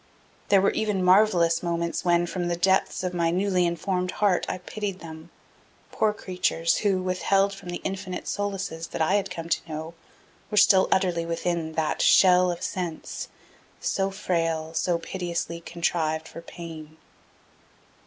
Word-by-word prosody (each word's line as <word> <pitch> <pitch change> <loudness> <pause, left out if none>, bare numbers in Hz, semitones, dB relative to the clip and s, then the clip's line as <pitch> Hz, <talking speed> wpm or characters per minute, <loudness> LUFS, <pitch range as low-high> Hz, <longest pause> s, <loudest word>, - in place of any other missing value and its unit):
There 195 -1 +6
were 195 - +3
even 210 -4 -1
marvelous 180 -3 +4
moments 170 -1 -2
when, 175 -1 +3
from 175 0 -3
the 175 - 0
depths 190 +2 +1
of 180 -1 -2
my 170 -1 +1
newly 180 0 +1
informed 180 +2 -1
heart, 200 -4 +1
I - - -2
pitied 195 +1 -5
them 160 -1 -10 0.6
poor 215 - +2
creatures, 180 -4 0
who, 195 -3 +1
withheld 195 +2 +1
from 195 -2 -10
the 175 - -5
infinite 190 -1 -4
solaces 195 -5 -3
that - - -2
I 160 - +1
had 200 -1 +1
come 165 -3 -6
to 165 0 -1
know, 160 +1 -5 0.6
were 210 - -3
still 195 -2 +6
utterly 180 -3 +2
within 170 -1 -2
that 160 -1 -1
Shell 180 -1 +6
of 175 -1 -4
sense 175 -4 -4 0.5
So 195 0 0
frail, 165 -5 -2
so 175 +1 +1
piteously 170 -1 -4
contrived 160 -2 -1
for 165 - -9
pain. 160 -2 -10
175 Hz, 155 wpm, -26 LUFS, 165-190 Hz, 0.6 s, There